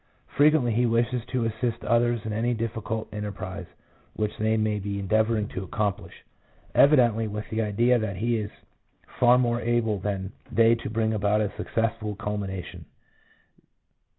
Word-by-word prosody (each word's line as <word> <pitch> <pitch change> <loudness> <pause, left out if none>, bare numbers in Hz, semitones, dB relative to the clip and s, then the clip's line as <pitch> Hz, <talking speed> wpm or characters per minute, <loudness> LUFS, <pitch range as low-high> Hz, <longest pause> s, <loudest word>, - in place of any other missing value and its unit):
Frequently 145 -4 +4
he 120 +2 +2
wishes 115 +1 +1
to 125 -3 -1
assist 115 +1 -2
others 120 -1 +2
in 110 - -3
any 120 +3 0
difficult 115 -1 -3
enterprise 100 -3 -5 0.5
which 105 -1 -2
they 110 +1 +2
may 110 -1 0
be 100 0 -4
endeavour 110 +3 +1
ing 105 -1 -1
to 95 - -5
accomplish, 100 +1 -3 0.5
evidently 120 -6 +5
with 105 0 -5
the 110 0 0
idea 115 +4 +2
that 110 -3 -3
he 115 +5 0
is 105 -1 -3 0.7
far 125 0 +6
more 120 -1 +1
able 115 -3 0
than 95 -1 -3 0.2
they 115 +1 +5
to 115 - -3
bring 110 0 0
about 105 0 +1
a 105 -1 -1
successful 110 -2 -2
culmination. 100 -3 -5
110 Hz, 150 wpm, -26 LUFS, 105-120 Hz, 0.7 s, far